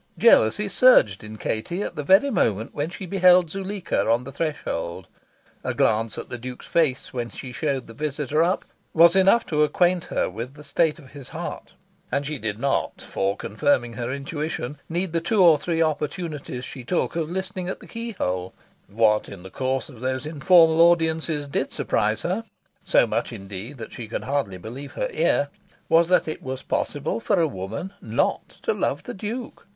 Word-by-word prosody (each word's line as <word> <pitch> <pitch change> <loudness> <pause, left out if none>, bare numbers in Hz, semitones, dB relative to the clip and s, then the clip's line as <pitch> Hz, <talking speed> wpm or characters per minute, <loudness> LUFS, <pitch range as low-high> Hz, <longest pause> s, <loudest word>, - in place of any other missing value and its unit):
Jealousy 115 - +5
surged 195 - +5
in 110 0 -8
Katie 170 - -2
at - - -5
the 150 - -2
very 195 - +5
moment 110 - 0
when 145 +2 -2
she 185 +2 -7
beheld 180 -2 +5
Zuleika 195 - -2
on 115 +2 +3
the 135 - -8
threshold. 95 - -3 0.6
A - - -2
glance 110 0 +1
at - - -6
the 120 - -6
Duke's 125 +1 -7
face 150 -6 0
when 120 -2 -3
she 130 - -8
showed 135 0 -2
the 115 - -11
visitor 150 +2 -1
up 175 +3 +1 0.3
was 170 +2 +7
enough 195 +4 +5
to 150 -2 0
acquaint 175 +4 +2
her - - 0
with 115 +8 -6
the 150 - -12
state 155 +2 +1
of 140 -6 -15
his 140 -3 -9
heart. - - -6 0.4
And 140 +1 0
she 150 -1 -4
did 105 -2 -3
not, 135 +4 -1
for 95 +1 -2
confirming 120 +2 0
her 120 +1 -3
intuition, 145 0 -4
need 175 +1 -2
the 165 - +1
two 195 +3 +3
or 165 -4 +7
three 165 +1 +1
opportunities 150 -4 -3
she 130 - -8
took 170 +7 -1
of 160 -2 -1
listening 185 0 -4
at - - -4
the - - -13
keyhole. 140 - -4 0.3
What 105 +1 +2
in 95 -3 -10
the 95 - -10
course 130 0 -1
of 125 -6 -13
those 130 +2 -2
informal 160 +2 +5
audiences 160 -3 +3
did 140 - -2
surprise 105 +2 0
her 190 +6 -1 0.4
so - - +4
much - - -2
indeed 100 +4 -8
that 110 -2 -8
she 115 -3 -7
could 115 - -4
hardly 135 -9 -1
believe 125 +9 -8
her - - -2
ear - - +2 0.4
was 165 +1 +5
that 180 - +3
it 155 - -4
was 130 0 -5
possible 145 +8 -2
for 205 -4 +1
a 165 - +3
woman 110 - -5
not - - 0
to 455 - +1
love - - -1
the - - -6
Duke. 225 +5 -6
145 Hz, 190 wpm, -24 LUFS, 120-175 Hz, 0.6 s, was